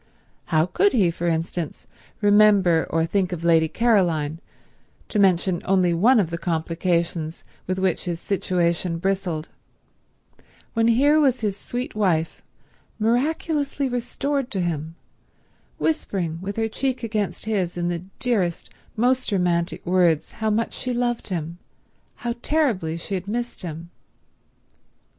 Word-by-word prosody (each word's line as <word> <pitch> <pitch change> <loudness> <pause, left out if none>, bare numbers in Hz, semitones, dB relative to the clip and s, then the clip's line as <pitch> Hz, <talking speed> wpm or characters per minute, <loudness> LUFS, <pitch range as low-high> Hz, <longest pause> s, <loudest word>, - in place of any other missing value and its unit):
How 155 -2 +2
could 395 - +2
he, 190 -8 +3
for 170 +1 -3
instance, 165 0 -2 0.4
remember 205 -5 +5
or 165 0 +1
think 185 +2 0
of 170 -2 -4
Lady 165 -1 +4
Caroline, 170 -8 +1 0.7
to 210 - 0
mention 185 -2 +3
only 185 -2 +2
one 225 +9 +5
of 175 -5 0
the 170 - -3
complications 165 -1 -1 0.2
with 185 +1 -1
which 185 -2 0
his 170 -2 -3
situation 175 -3 0
bristled, 180 -3 -2 1.2
when 225 -1 +2
here 285 +7 +4
was 265 -5 +2
his 205 -3 -1
sweet 245 +5 -5
wife, 180 -6 0 0.6
miraculously 280 +5 0
restored 255 +2 -2
to 195 -7 -2
him, 165 -2 -3 0.8
whispering 185 - -1
with 195 +1 -4
her 225 0 0
cheek 255 +2 -2
against 210 -6 -2
his 190 -6 -1
in 175 0 0
the 175 -1 -2 0.2
dearest, 200 -9 -1 0.3
most 250 +1 +2
romantic 175 -3 0
words 175 -3 +2
how 220 -1 -2
much 220 +2 0
she 250 -1 -2
loved 240 -1 -1
him, 170 -2 -4 0.7
how 235 - 0
terribly 225 - +1
she 170 - -6
had 190 0 -3
missed 240 +3 -3
him? 170 0 -7
185 Hz, 135 wpm, -23 LUFS, 170-230 Hz, 1.2 s, remember